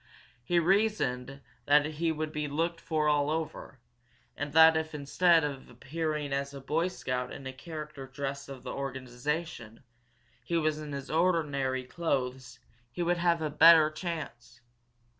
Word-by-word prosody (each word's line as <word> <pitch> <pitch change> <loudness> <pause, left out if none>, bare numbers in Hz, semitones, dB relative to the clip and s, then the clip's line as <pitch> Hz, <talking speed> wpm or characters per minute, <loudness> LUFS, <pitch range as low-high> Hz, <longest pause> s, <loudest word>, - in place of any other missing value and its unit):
He 175 +8 0
reasoned 165 - +1 0.3
that 145 +1 +5
he 160 +2 -1
would 155 0 -3
be 150 -1 -3
looked 165 +4 -2
for 155 -2 0
all 145 -1 +2
over, 155 -3 -4 0.6
and 145 0 -4
that 160 0 +8
if, 160 -1 -2
instead 160 +4 +3
of 140 -3 -5
appearing 150 +3 -3
as 140 0 -2
a - - -6
Boy 155 +6 0
Scout 125 -8 -3
in - - -8
character 150 -1 -8
dress 140 +1 -5
of 135 -2 -9
the - - -5
organization, 130 -2 -4 0.6
he 170 +7 -1
was 155 -1 0
in 150 -2 -6 0.2
ordinary 150 -6 +1
clothes, 130 -4 -3 0.3
he 175 - -3
would 175 +1 +1
have 170 -1 +1
a 155 - -2
better 160 0 +7
chance. 155 -9 -6
150 Hz, 145 wpm, -30 LUFS, 135-165 Hz, 0.6 s, that